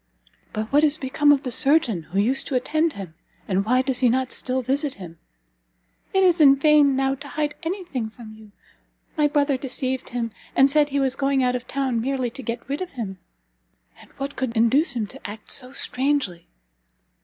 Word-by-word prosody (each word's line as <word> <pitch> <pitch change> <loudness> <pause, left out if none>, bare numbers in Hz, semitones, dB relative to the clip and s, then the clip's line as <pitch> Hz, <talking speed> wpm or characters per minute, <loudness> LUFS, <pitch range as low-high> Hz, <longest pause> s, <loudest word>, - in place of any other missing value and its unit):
"But 215 +4 -5
what 295 +2 +5
is 305 0 +3
become 290 +1 +2
of 285 -1 +3
the 255 - -4
surgeon 270 - +2
who 160 +4 -7
used 240 +7 +1
to 270 - -2
attend 310 +5 +1
him, 190 -5 -8 0.3
and 195 0 +1
why 255 +3 +3
does 260 -2 -1
he 250 - +4
not 260 +2 0
still 255 0 -2
visit 275 +3 -1
him?" 170 -4 -11 0.9
"It 385 0 +3
is 355 -3 +4
in 275 -2 +8
vain, 290 -1 +4
now, 270 0 +1
to 280 +2 -9
hide 295 +2 -2
any 365 +3 -4
thing 250 -9 -4
from 220 -1 -12
you; 215 -1 -15 0.6
my 300 -3 +3
brother 285 -2 +1
deceived 260 0 -3
him, 235 -2 -3 0.2
and 270 +1 +5
said 295 0 +3
he 280 0 0
was 265 -1 0
going 275 -1 +1
out 250 0 +1
of 245 -1 -5
town 260 -4 -1
merely 260 -1 -1
to 270 - -8
get 235 -1 -5
rid 280 +5 -3
of 370 - -5
him." 200 -7 -6 0.8
"And - - -17
what 275 +1 -5
could 250 -3 -3
induce 250 +6 +3
him 225 -3 -1
to 255 +1 -9
act 210 +1 -2
so 255 -2 0
strangely?" 265 -10 -1
265 Hz, 200 wpm, -23 LUFS, 235-285 Hz, 0.9 s, in